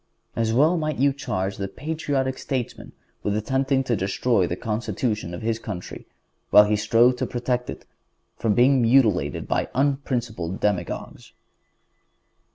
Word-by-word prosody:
As 115 -1 0
well 150 +9 +3
might 155 -2 -2
you 140 +1 +3
charge 95 -8 -3
the 100 - -3
patriotic 145 +1 -2
statesman 130 -4 -4 0.3
with 105 - -1
attempting 135 +4 0
to 125 -2 0
destroy 100 +1 +1
the 85 - -2
constitution 110 - -2
of 85 +4 -7
his 115 0 -1
country, 100 -6 -7 0.4
while 105 - +8
he 105 +1 +1
strove 120 +4 +3
to - - -2
protect 125 0 -2
it - - -7 0.5
from 110 -3 0
being 130 +2 +4
mutilated 115 - +2
by - - -1
unprincipled 120 -9 -1
demagogues. 95 -4 -3
120 Hz, 140 wpm, -24 LUFS, 105-135 Hz, 0.5 s, while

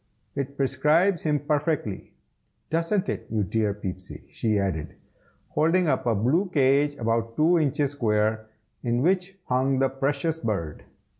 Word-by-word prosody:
"It 140 0 -4
prescribes 150 +7 +2
him 150 -2 0
perfectly. 150 - -1 0.6
Doesn't 170 +5 0
it, - - -4
you 110 -2 0
dear 105 +2 0
Peepsy?" 95 -2 -7
she 110 -2 0
added, 95 -6 -2 0.5
holding 170 +3 +2
up 130 -4 0
a 115 - +3
blue 145 - +1
cage 145 -1 +3
about 115 -2 -1
two 165 +3 +4
inches 145 -2 +1
square, 110 -4 0 0.3
in 120 +1 0
which 185 +2 +1
hung 130 +1 +1
the 135 0 +2
precious 145 +4 -1
bird. 85 - -3
135 Hz, 140 wpm, -25 LUFS, 110-155 Hz, 0.6 s, two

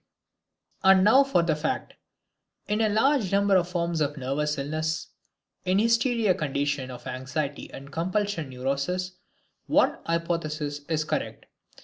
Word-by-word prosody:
And 190 0 +6
now 260 +7 +7
for 270 -11 +2
the 165 -2 +1
fact! 150 +1 -3 0.7
In 210 +2 0
a 220 - +3
large 220 0 +2
number 200 0 +3
of 180 -1 +2
forms 170 -2 -1
of 145 0 0
nervous 145 +3 -1
illness, 155 +3 -2 0.5
in 185 0 +2
hysteria, 230 -1 +3
conditions 145 -3 -2
of 125 -1 -9
anxiety 130 +3 -4
and 140 +1 -10
compulsion 185 -1 -1
neuroses, 140 +9 -2 0.5
one - - +3
hypothesis 155 -3 -2
is 155 -2 +1
correct. - - -3
165 Hz, 130 wpm, -26 LUFS, 145-195 Hz, 0.7 s, now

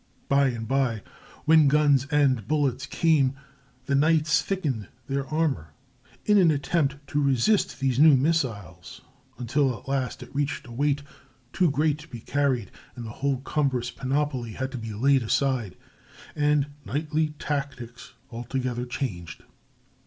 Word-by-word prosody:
By 140 0 +4
and 115 -3 -4
by, 130 -5 0 0.4
when 155 -1 +6
guns 140 -2 +3
and 135 -8 +2
bullets 135 -3 0
came, 145 -4 +2 0.5
the 140 - -1
knights 155 +2 +3
thickened 145 - -2 0.2
their 140 0 -2
armor 135 - -1 0.5
in 210 -1 +5
an 175 -3 +5
attempt 145 -1 +1
to 145 - 0
resist 140 - +2
these 130 -2 0
new 150 -2 +7
missiles, 120 - -2 0.4
until 130 +1 0
at - - -18
last 135 -2 -2
it 120 - -15
reached 145 0 -2
a 120 - -12
weight 140 +3 0 0.5
too 180 -3 +3
great 150 +1 +1
to 155 - -12
be 120 -7 -9
carried, 130 -5 -1 0.2
and 120 - -7
the 110 - -6
whole 140 -2 0
cumbrous 135 -4 -1
panoply 135 -4 -2
had 130 +3 -4
to 130 - -5
be 115 -1 -6
laid 135 +4 +3
aside, 120 -3 0 0.6
and 145 -1 +1
knightly 150 +1 -1
tactics 135 -6 -5 0.2
altogether 125 +1 -3
changed. 90 - -5
135 Hz, 145 wpm, -26 LUFS, 125-150 Hz, 0.6 s, new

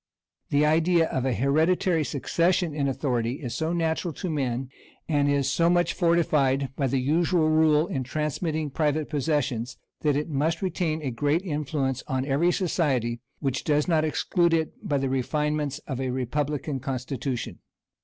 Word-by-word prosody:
The 145 +1 +3
idea 165 +2 +3
of 130 -1 -1
an 130 -3 +1
hereditary 160 - +2
succession 165 +5 0
in 145 -2 0
authority 125 -4 -1
is 130 -4 -5
so 160 +1 -1
natural 165 0 0
to 185 -4 -3
men, 130 -3 -2 0.4
and 145 -3 +2
is 140 -1 +1
so 165 +5 +2
much 175 -1 +2
fortified 150 -6 +2
by 140 - 0
the 135 - 0
usual 160 +4 +2
rule 155 -1 +4
in 135 -6 -3
transmitting 155 +2 -2
private 150 +1 0
possessions, 135 -5 -1 0.2
that 150 -2 +1
it 150 +1 -1
must 155 +4 -1
retain 160 -4 -1
a 135 - -2
great 145 +8 0
influence 145 -5 -2
on 130 0 -1
every 145 +6 +2
society, 135 - 0 0.2
which 135 -2 -1
does 150 -1 +1
not 160 -3 +3
exclude 170 +2 +1
it 160 -1 -1
by 145 - -1
the 135 0 0
refinements 150 +2 -1
of 130 -2 -4
a 130 - -1
republican 140 +3 -2
constitution. 130 -1 -4
150 Hz, 160 wpm, -26 LUFS, 135-160 Hz, 0.4 s, rule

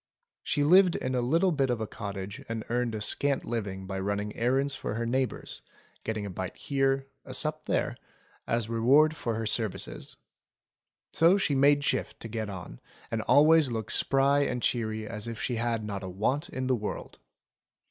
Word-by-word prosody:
She 145 - 0
lived 180 +3 +6
in 130 - -2
a 125 - +1
little 165 +10 +2
bit 140 -4 +1
of 120 -2 0
a 110 - -2
cottage 100 -2 -6
and 115 -1 -3
earned 120 -2 0
a 105 - -4
scant 140 +6 +1
living 100 -5 -3
by 95 0 -4
running 100 +2 -2
errands 135 +4 +1
for - - -4
her 115 +1 -2
neighbours, 130 +2 -2 0.4
getting 110 -2 -3
a - - -4
bite 95 0 -5
here, 135 -1 0 0.2
a 130 - -7
sup 155 0 -2
there, - - 0 0.5
as 115 -1 0
reward 135 +8 +4
for 115 -6 -2
her 110 0 -2
services. 105 - -2 1.0
So 170 +5 +5
she 175 -7 0
made 140 +1 +4
shift - - -1
to - - -5
get 110 -1 -4
on, 95 -3 -8 0.3
and 115 - -1
always 150 +5 +5
looked 110 -2 -3
as - - +3
spry 135 +1 +3
and 125 -3 0
cheery 110 -2 -1
as 105 0 -4
if 115 -1 -5
she 120 - -2
had 115 -1 -1
not 100 -2 -4
a 95 - -5
want 125 - -1
in 130 0 -3
the 130 - +2
world. 105 -3 -6
120 Hz, 190 wpm, -29 LUFS, 110-140 Hz, 1.0 s, lived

